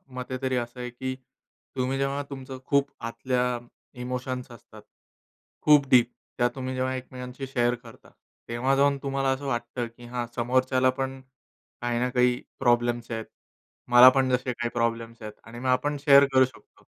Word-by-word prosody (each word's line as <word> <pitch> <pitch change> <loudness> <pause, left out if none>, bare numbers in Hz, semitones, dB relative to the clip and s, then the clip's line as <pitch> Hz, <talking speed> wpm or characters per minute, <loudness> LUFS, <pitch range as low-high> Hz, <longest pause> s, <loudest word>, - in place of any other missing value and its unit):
मते 130 0 -4
तरी 130 -1 0
असं 120 +1 -4
आहे, 125 0 -4
की 130 +2 -5 0.6
तुम्ही 130 +1 -1
जेव्हा 140 +1 -1
तुमचं 135 -1 -7
खूप 140 0 +2
आतल्या 125 +1 -1 0.4
इमोशन्स 125 0 -4
असतात, 115 - -14 0.8
खूप 150 -2 +5
डीप 120 -1 +5 0.3
त्या 120 - +3
तुम्ही 130 -1 -4
जेव्हा 130 0 -1
एकमेकांशी 130 +1 -7
शेअर 120 -2 +1
करता, 120 -2 -16 0.4
तेव्हा 130 +4 +1
जाऊन 140 0 +3
तुम्हाला 135 0 0
असं 130 +2 -3
वाटतं, 120 -1 -2
की 115 +1 -15
हा 120 0 -3
समोरच्याला 130 +2 +2
पण 135 0 -3 0.6
काही 120 -1 -1
ना 125 - +1
काही 125 -1 +2 0.2
प्रॉब्लेम्स 120 0 +1
आहेत. 110 -1 -3 0.7
मला 120 +1 +10
पण 130 0 +2
जसे 125 0 0
काही 120 0 -3
प्रॉब्लेम्स 115 -1 -2
आहेत 105 -1 -7
आणि 115 +1 -10
मग 130 - -4
आपण 145 +3 +1
शेअर 140 -1 +7
करू 130 0 +6
शकतो 130 - -17
125 Hz, 160 wpm, -26 LUFS, 120-130 Hz, 0.8 s, मला